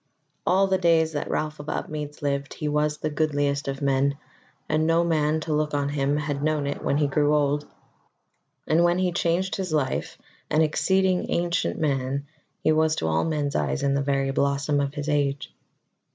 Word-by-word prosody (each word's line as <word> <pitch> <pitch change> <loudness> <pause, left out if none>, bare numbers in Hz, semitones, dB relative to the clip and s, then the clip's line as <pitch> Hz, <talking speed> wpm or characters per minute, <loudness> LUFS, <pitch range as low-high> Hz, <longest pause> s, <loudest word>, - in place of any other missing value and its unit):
All 190 +2 +4
the 190 -1 +1
days 165 -2 +3
that 145 - -3
Ralph 155 0 -2
of 145 - -7
Upmeads 150 0 -5
lived, 140 0 -2
he 150 - -3
was 150 0 0
the 155 - -2
goodliest 145 -2 0
of 135 +1 -3
men, 140 +1 +2 0.5
and 155 +1 +1
no 165 +1 +3
man 155 -2 +1
to 155 0 -2
look 150 0 0
on 140 0 0
him 145 0 0
had 145 -2 -2
known 155 -1 0
it 140 - -3
when 140 - +1
he 150 - +2
grew 145 +1 +2
old; 145 0 +1 1.0
and 160 +2 +3
when 175 0 +3
he 185 -1 +1
changed 175 +2 0
his 185 -3 -3
life, 145 -4 -1 0.3
an 155 +1 +3
exceeding 185 +4 +1
ancient 170 - 0
man, 140 -2 -1 0.4
he 155 - +4
was 155 0 +3
to 80 - -2
all 80 0 +1
men's 150 -3 -1
eyes 145 - 0
in 140 0 +2
the 140 - +1
very 135 -1 0
blossom 140 +1 +1
of 140 0 -2
his 145 0 -4
age. 145 -2 -1
150 Hz, 190 wpm, -25 LUFS, 140-160 Hz, 1.0 s, All